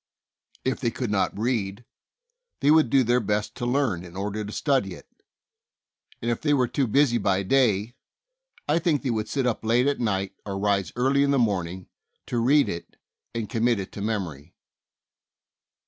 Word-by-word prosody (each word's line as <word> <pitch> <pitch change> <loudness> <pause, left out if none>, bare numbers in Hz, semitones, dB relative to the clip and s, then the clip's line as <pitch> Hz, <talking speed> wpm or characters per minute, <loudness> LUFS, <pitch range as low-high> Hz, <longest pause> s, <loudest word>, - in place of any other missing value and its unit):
If 130 - 0
they 120 - 0
could 120 -1 -4
not 100 -1 0
read, 110 -1 -2 0.8
they 145 - +4
would 155 -5 +5
do 135 +1 +4
their 120 +1 +3
best 105 -1 -1
to 120 - -4
learn 125 -9 0
in 90 0 -11
order 105 +2 -3
to 105 - -7
study 125 - 0
it, - - -15 1.2
and 120 - +1
if 120 - -2
they 145 -1 +2
were 130 -3 +2
too 135 +2 0
busy 120 0 +3
by 95 -1 +1
day, 115 -1 +2 0.7
I 150 +3 +3
think 160 -4 +1
they 130 - 0
would 110 -1 -2
sit 135 -2 -1
up 120 -3 -1
late 120 +3 +3
at 145 0 +1
night 100 -4 -1
or 100 -2 -4
rise 100 -1 0
early 135 +3 +2
in 140 - +3
the 140 - +3
morning 95 -6 -1 0.4
to 120 - -2
read 140 +5 +4
it 85 - -6 0.4
and 115 -2 -2
commit 115 +1 +1
it 95 - -6
to 100 - -7
memory. 90 -8 -4
115 Hz, 180 wpm, -25 LUFS, 100-130 Hz, 1.2 s, would